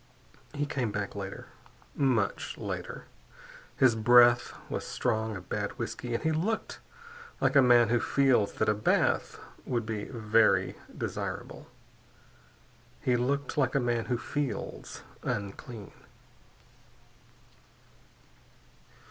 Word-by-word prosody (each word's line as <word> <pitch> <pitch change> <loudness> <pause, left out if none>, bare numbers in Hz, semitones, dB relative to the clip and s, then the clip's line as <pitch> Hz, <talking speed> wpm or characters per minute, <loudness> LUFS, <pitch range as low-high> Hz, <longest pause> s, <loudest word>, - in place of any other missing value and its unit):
He 145 0 0
came 130 -6 -2
back 100 0 -3
later, 100 -1 -7 0.4
much 125 -7 0
later. - - -5 0.7
His 130 -4 +5
breath 120 +2 +6 0.2
was - - -3
strong 110 -3 -1
of 90 -2 -9
bad - - -3
whiskey 120 -1 -4
and - - -3
he 160 - +2
looked 195 +8 -2 0.6
like - - +1
a 140 - +8
man 120 -3 +6
who 120 +1 +3
feels 130 -5 +2
that 110 - 0
a 105 - +4
bath 105 +1 +1 0.3
would 120 -3 -2
be 110 -2 -3
very 115 -2 +2 0.2
desirable. - - -5 1.3
He 125 -4 +1
looked 140 +5 -1
like 130 -1 +1
a - - +4
man 120 -2 0
who 125 - 0
feels 145 +2 -4 0.2
unclean. 105 +2 -5
120 Hz, 115 wpm, -29 LUFS, 110-135 Hz, 1.3 s, a